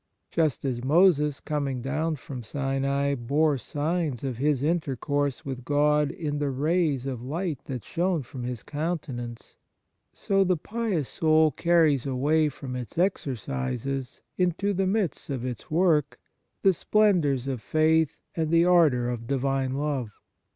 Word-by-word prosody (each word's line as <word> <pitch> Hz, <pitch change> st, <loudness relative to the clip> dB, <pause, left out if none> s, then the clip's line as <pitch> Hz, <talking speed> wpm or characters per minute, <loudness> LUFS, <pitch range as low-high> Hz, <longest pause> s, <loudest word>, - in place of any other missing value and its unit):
Just 155 Hz, -5 st, 0 dB
as 125 Hz, -3 st, -2 dB
Moses, 150 Hz, -1 st, +4 dB
coming 140 Hz, -4 st, -2 dB
down 155 Hz, +4 st, -1 dB
from 135 Hz, -3 st, -8 dB
Sinai, 140 Hz, +3 st, -1 dB
bore 140 Hz, +3 st, +1 dB
signs 150 Hz, 0 st, -2 dB
of 130 Hz, -4 st, -3 dB
His 140 Hz, 0 st, +1 dB
intercourse 145 Hz, -3 st, -1 dB
with 130 Hz, -2 st, -5 dB
God 150 Hz, +1 st, +2 dB
in 155 Hz, -5 st, -3 dB
the 145 Hz, -1 st, 0 dB
rays 145 Hz, 0 st, +1 dB
of 130 Hz, -4 st, -4 dB
light 155 Hz, +3 st, -3 dB
that 130 Hz, -4 st, -5 dB
shone 175 Hz, -3 st, -1 dB
from 125 Hz, +1 st, -9 dB
his 120 Hz, -2 st, -4 dB
counten 150 Hz, -5 st, -3 dB
ance, 120 Hz, -1 st, -10 dB, 0.5 s
so 195 Hz, -1 st, +1 dB
the 185 Hz, -2 st, +1 dB
pious 200 Hz, -, -2 dB
soul 155 Hz, -1 st, +3 dB
carries 155 Hz, -4 st, +3 dB
away 150 Hz, +4 st, +2 dB
from 130 Hz, -2 st, -7 dB
its 125 Hz, +3 st, -7 dB
exercises 135 Hz, -, -2 dB, 0.2 s
into 180 Hz, +3 st, +1 dB
the 190 Hz, 0 st, 0 dB
midst 195 Hz, -6 st, -1 dB
of 130 Hz, -3 st, -3 dB
its 125 Hz, -4 st, -6 dB
work 155 Hz, -3 st, +2 dB, 0.5 s
the 195 Hz, -, +6 dB
splendours 170 Hz, -, +2 dB
of 130 Hz, -4 st, -3 dB
faith 155 Hz, +3 st, +2 dB, 0.2 s
and 160 Hz, -2 st, 0 dB
the 165 Hz, +1 st, +4 dB
ardour 155 Hz, -9 st, +4 dB
of 120 Hz, -2 st, -4 dB
divine 135 Hz, 0 st, 0 dB
love. 140 Hz, -5 st, -2 dB
145 Hz, 145 wpm, -26 LUFS, 130-165 Hz, 0.5 s, the